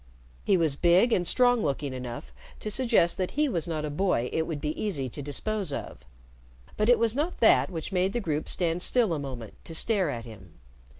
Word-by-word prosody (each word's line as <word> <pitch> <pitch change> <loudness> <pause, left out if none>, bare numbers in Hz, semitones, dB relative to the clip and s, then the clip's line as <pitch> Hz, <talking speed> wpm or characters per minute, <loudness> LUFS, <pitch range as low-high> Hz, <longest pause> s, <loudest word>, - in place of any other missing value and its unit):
He 195 - +3
was 160 -5 +1
big 180 +9 +4
and 175 -2 +1
strong 245 +1 +3
looking 140 -3 -2
enough 125 -2 -7 0.3
to 215 - -5
suggest 230 -8 +2
that 185 - 0
he 300 0 +3
was 175 - -2
not 155 -2 -2
a 150 - -4
boy 150 -7 0
it 160 0 0
would 155 -3 -4
be 150 - -3
easy 150 -12 -2
to 145 - -7
dispose 185 +6 -3
of, 65 - -7 0.7
but 210 +2 +1
it 245 - +6
was 230 0 0
not 310 +6 -2
that 225 - +5
which 165 -1 -6
made 185 +1 +1
the 240 - 0
group 155 -7 -2
stand 175 -1 -1
still 225 -3 +2
a 155 - -2
moment 130 -6 -7
to 165 - -7
stare 195 -2 +4
at 120 -4 -5
him. 95 -7 -13
170 Hz, 215 wpm, -27 LUFS, 145-215 Hz, 0.7 s, it